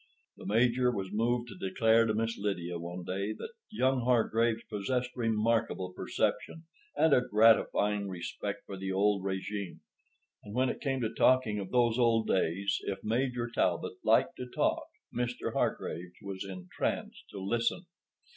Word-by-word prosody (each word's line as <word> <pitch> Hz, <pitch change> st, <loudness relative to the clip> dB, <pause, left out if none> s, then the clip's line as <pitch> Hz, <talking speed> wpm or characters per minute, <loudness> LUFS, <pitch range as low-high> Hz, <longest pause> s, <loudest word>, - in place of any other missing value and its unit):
The -, -, -9 dB
Major 120 Hz, +4 st, +3 dB
was 100 Hz, -4 st, -4 dB
moved 120 Hz, +3 st, 0 dB
to -, -, -9 dB
declare 115 Hz, +3 st, +4 dB
to 110 Hz, -, 0 dB
Miss 115 Hz, +1 st, 0 dB
Lydia 90 Hz, -4 st, -3 dB
one 85 Hz, +1 st, -6 dB
day 100 Hz, +4 st, -2 dB
that 435 Hz, -, -8 dB, 0.2 s
young 130 Hz, -10 st, +1 dB
Hargraves 115 Hz, -1 st, +2 dB
possessed 125 Hz, +4 st, -2 dB
remarkable 115 Hz, -5 st, 0 dB
perception 160 Hz, -, -2 dB, 0.3 s
and 160 Hz, -2 st, +4 dB
a 125 Hz, -, +6 dB
gratifying 105 Hz, -3 st, +3 dB
respect 90 Hz, -2 st, -5 dB
for 100 Hz, -, -7 dB
the 95 Hz, 0 st, -3 dB
old 100 Hz, 0 st, +2 dB
régime. 95 Hz, 0 st, -4 dB, 0.6 s
And 105 Hz, +1 st, -9 dB
when 130 Hz, 0 st, +2 dB
it -, -, -4 dB
came 135 Hz, -3 st, -1 dB
to 110 Hz, -2 st, -1 dB
talking 125 Hz, -5 st, +3 dB
of 95 Hz, -2 st, -5 dB
those 120 Hz, -1 st, +2 dB
old 115 Hz, -2 st, +3 dB
days—if 95 Hz, +2 st, 0 dB
Major 120 Hz, +1 st, 0 dB
Talbot -, -, -1 dB
liked -, -, +3 dB
to 125 Hz, -, -5 dB
talk, -, -, 0 dB, 0.3 s
Mr. 120 Hz, 0 st, -2 dB
Hargraves 90 Hz, +1 st, -2 dB
was 95 Hz, -1 st, -5 dB
entranced 90 Hz, -2 st, -4 dB
to -, -, -9 dB
listen. 115 Hz, -, -1 dB
110 Hz, 150 wpm, -31 LUFS, 100-120 Hz, 0.6 s, a